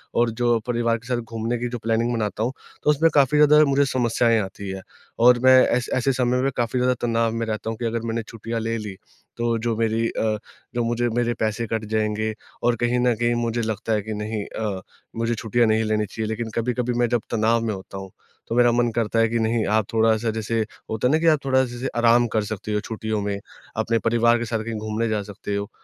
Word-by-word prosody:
और 120 0 +3
जो 120 0 +1
परिवार 115 -1 +1
के 120 +2 -15
साथ 125 -1 0
घूमने 115 +1 -3
की 120 - -2
जो 120 - -4
प्लानिंग 115 +2 0
बनाता 110 -1 -2
हूँ 125 +3 -1 0.3
तो - - +2
उसमें 160 +3 +4
काफ़ी 145 +1 +4
ज़्यादा 150 +1 +7
मुझे 140 0 +3
समस्याएँ 120 -3 +2
आती 95 +1 -6
हैं। 95 0 -6 0.4
और 125 0 +7
मैं 130 0 +7
ऐ 125 - +2
ऐसे 130 +1 +2
समय 125 0 +1
में 135 +1 +1
काफ़ी 120 +1 0
ज़्यादा 125 0 +3
तनाव 115 -1 +1
में 115 0 -2
रहता 110 0 -3
हूँ 115 - -4
कि 120 - -4
अगर 115 0 -1
मैंने 115 0 -1
छुट्टियाँ 115 0 -5
ले 115 +1 -2
ली 105 -3 -6 0.4
तो 120 -1 0
जो 115 0 -1
मेरी 115 0 +1
अ, 110 -1 -1 0.4
जो 120 - +1
मुझे 120 +1 0
मेरे 120 +1 0
पैसे 110 +1 -1
कट 110 0 -2
जाएँगे 110 0 0 0.3
और 120 0 +3
कहीं 120 +1 +2
न 125 -1 +3
कहीं 120 +1 +1
मुझे 120 0 -1
लगता 110 0 -2
है 105 - +1
कि 110 +2 -5
नहीं 105 0 -3
अ, 100 -4 -4 0.3
मुझे 115 +1 0
छुट्टियाँ 115 +2 +1
नहीं 110 +1 +2
लेनी 110 -1 0
चाहिए, 110 +2 -4
लेकिन 110 +1 -3
कभी-कभी 125 +1 -1
मैं 120 - +3
जब 120 -2 +1
तनाव 115 +1 +2
में 110 - -1
होता 95 0 -8
हूँ, 95 -1 -8 0.4
तो 115 - -2
मेरा 120 -1 +5
मन 120 0 +2
करता 115 -1 0
है 115 - +4
कि 115 - 0
नहीं 110 0 +1
आप 110 0 +2
थोड़ा-सा 110 0 +2
जैसे 110 +1 -2 0.3
होता 110 +3 0
है - - +2
ना 155 - +4
कि 165 - +1
आप 155 -2 +5
थोड़ा-सा 130 -1 +3
जैसे 125 +2 -4
आराम 120 0 +4
कर 110 -1 +2
सकते 105 0 -5
हो 105 - +1
छुट्टियों 110 -1 -3
में। 100 0 -2 0.4
अपने 115 0 +1
परिवार 120 +1 +3
के 120 - -2
साथ 110 -1 -2
कहीं 115 0 -4
घूमने 110 +2 -2
जा 105 -1 0
सकते 100 0 -5
हो, 100 0 -3
115 Hz, 235 wpm, -23 LUFS, 110-120 Hz, 0.4 s, ज़्यादा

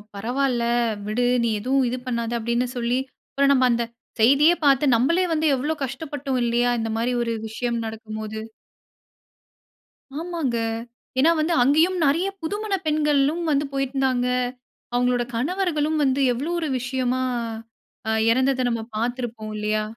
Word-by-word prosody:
பரவால, 245 +4 0 0.5
விடு 240 +3 0 0.2
நீ 235 - +2
எதுவும் 260 +4 +1
இது 250 - -2
பண்ணாத! 235 -2 -2
அப்படினு 235 +2 0
சொல்லி 240 +1 0 0.3
அப்புறம் 280 0 +3
நம்ம 255 -2 +4
அந்த 235 0 +1 0.4
செய்திய 280 +8 +6
பாத்து 280 0 +4
நம்மளே 330 +11 +2
வந்து, 315 0 0
எவ்ளோ 295 +5 -1
கஷ்டப்பட்டோம் 275 0 -3
இல்லையா? 240 +1 +2
இந்த 225 0 -2
மாரி 235 +2 0
ஒரு 230 -1 -1
விஷயம் 235 +2 -2
நடக்கும் 220 -1 -6
போது. 215 0 -5 1.8
ஆமாங்க. 330 -8 -2 0.6
ஏன்னா 315 +5 +5
வந்து, 320 +2 +1
அங்கேயும் 320 +8 +3
நறைய 325 +7 +2
புதுமண 410 +5 -3
பெண்களும் 300 +1 +2
வந்து 290 0 +2
போயிருந்தாங்க. 265 -2 0 0.7
அவங்களோட 245 0 +2
கணவர்களும் 315 +2 0
வந்து 270 0 +2
எவ்வளவு 295 +8 -2
ஒரு 320 -3 -2
விஷயமா 255 +1 -1 0.9
அ - - +2 0.2
இறந்தத 260 +2 +2
நம்ம 230 -1 -1
பாத்துருப்போம் 235 -1 -3
இல்லையா. 215 0 0
255 Hz, 130 wpm, -23 LUFS, 235-295 Hz, 1.8 s, செய்திய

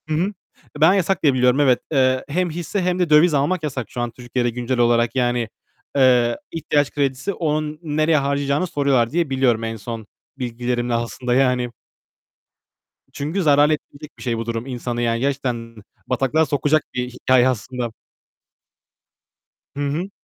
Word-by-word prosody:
Hı - - 0
hı. 185 +6 0 0.5
Ben 160 +4 +7
yasak 195 -1 +1
diye 145 -3 +5
biliyorum, 125 +1 +3
evet. 130 -4 +4
Eee, 130 -3 +2
hem 175 +5 0
hisse 175 +4 -3
hem 180 0 0
de 180 -3 +1
döviz 155 +2 +6
almak 155 +5 +1
yasak 130 -6 -4
şu 120 - -4
an 120 -1 -2
Türkiye'de 120 0 -2
güncel 120 +1 -2
olarak. 120 0 +3
Yani, 120 -2 0 0.5
eee, 125 -3 +4
ihtiyaç 150 -3 0
kredisi, 140 +6 -1
onun 155 -2 -2
nereye 155 0 +2
harcayacağını 140 +3 0
soruyorlar 140 -7 +1
diye 165 -1 0
biliyorum 130 -4 +1
en 115 0 -3
son 110 0 -7 0.3
bilgilerimle 120 -1 -2
aslında 120 +1 -2
yani. 125 -2 +2 1.4
I - - -35
çünkü 155 +7 -2
zarar 145 -1 +5
ettirecek 150 -1 -5
bir - - -10
şey 120 -2 -1
bu 115 - -4
durum 115 0 -3
insanı 120 -2 -4
yani. 115 -1 0
Gerçekten 125 -4 -2 0.3
bataklığa 135 +5 +1
sokacak 145 +1 +1
bir 125 0 -2
hikâye 125 0 +3
aslında. 125 0 -3 1.8
Hı - - -6
hı. 170 +7 -3
130 Hz, 155 wpm, -21 LUFS, 120-150 Hz, 1.8 s, Ben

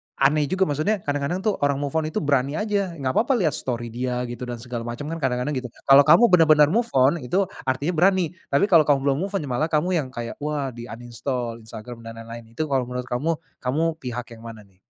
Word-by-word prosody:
aneh 145 +2 +2
juga. 190 +6 +1
Maksudnya 165 +6 0
kadang-kadang, 145 +6 -2
tuh, 215 -2 +1
orang 145 0 +2
move 140 0 -3
on 155 - -2
itu 155 - -3
berani 140 0 +1
aja, 200 -4 -1
nggak 135 -4 -2
papa 240 - +2
lihat 180 -10 +2
story 120 -4 -4
dia 125 +1 -2
gitu 120 0 -6
dan 120 - -4
segala 120 -2 -5
macem 120 +4 -5 0.2
kadang-kadang, 125 0 -1
gitu. 125 - -6 0.2
Kalau 135 +1 +7
kamu 170 +9 +7
bener-bener 155 -4 +6
move 235 +4 +1
on, 135 +6 +4
itu 150 +9 0 0.2
artinya 140 +6 0
berani, 180 0 +2 0.2
tapi 140 - +2
kalau 160 -4 +6
kamu 145 -2 +4
belum 135 - 0
move 200 - -13
on, 195 - -1
ya 140 - -6
malah 145 +6 +1
kamu 160 +2 0
yang 140 - -3
kayak, 120 -1 -6
wah, 145 -2 -2
di 120 0 -9
uninstall 120 0 -5
Instagram 115 +1 -9
dan 115 - -8
lain-lain. 115 0 -11
Itu 155 - -1
kalau 130 -3 +1
menurut 125 0 -4
kamu, 150 +7 0 0.2
kamu 135 +6 -1 0.2
pihak 125 -2 -6
yang - - -15
mana, 110 -2 -10
nih? 95 -2 -27
140 Hz, 225 wpm, -23 LUFS, 125-155 Hz, 0.2 s, Kalau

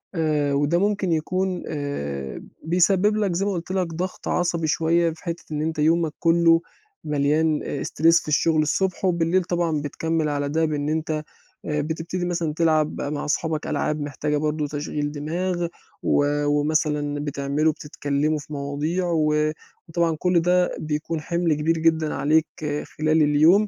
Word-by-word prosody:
آآ 150 -3 +1
وده 145 +4 +2
ممكن 200 -2 +1
يكون 180 +3 -1
آآ 70 - -4 0.2
بيسبب 185 +5 +3
لك 205 -4 +1
زي 190 +3 0
ما 205 - 0
قُلت 175 -1 -4
لك 185 -2 0
ضغط 185 +3 -4
عصبي 170 -2 0
شوية 165 +3 +2
في 160 - -17
حتّة 170 -1 -4
إن 150 -1 -2
أنت 160 0 -2
يومك 160 0 +2
كلّه 165 0 +4 0.4
مليان 150 +1 +1
آآ 140 - -4
استرِس 165 +2 +3
في - - -14
الشغل 155 +1 +3
الصبح 190 +5 0
وبالليل 175 +1 +2
طبعًا 170 -4 0
بتكمّل 160 +2 -1
على 145 -1 -1
ده 160 +2 +1
بإن 150 -1 -1
أنت 160 0 -1 0.5
آآ 150 -1 0
بتبتدي 165 +4 -3
مثلًا 170 -3 -1
تلعب 155 -1 +1
مع 145 +1 -3
صحابك 155 0 -1
ألعاب 150 +1 -1
محتاجة 145 +1 -2
برضه 150 0 -1
تشغيل 145 0 -3
دماغ 170 +4 -2 0.4
و 145 - +3 0.2
ومثلًا 145 0 +1
بتعملوا 145 +2 0
بتتكلموا 145 +1 -1
في 150 - -10
مواضيع 145 +6 -2
و 150 -1 +2 0.4
وطبعًا 165 0 +1
كل 180 -1 +3
ده 180 +1 +2
بيكون 155 +1 -3
حِمل 170 +1 0
كبير 155 +2 +1
جدًا 160 -1 +2
عليك 155 +3 +2 0.4
خلال 155 +1 +1
اليوم، 155 +8 +5
155 Hz, 155 wpm, -23 LUFS, 150-170 Hz, 0.5 s, اليوم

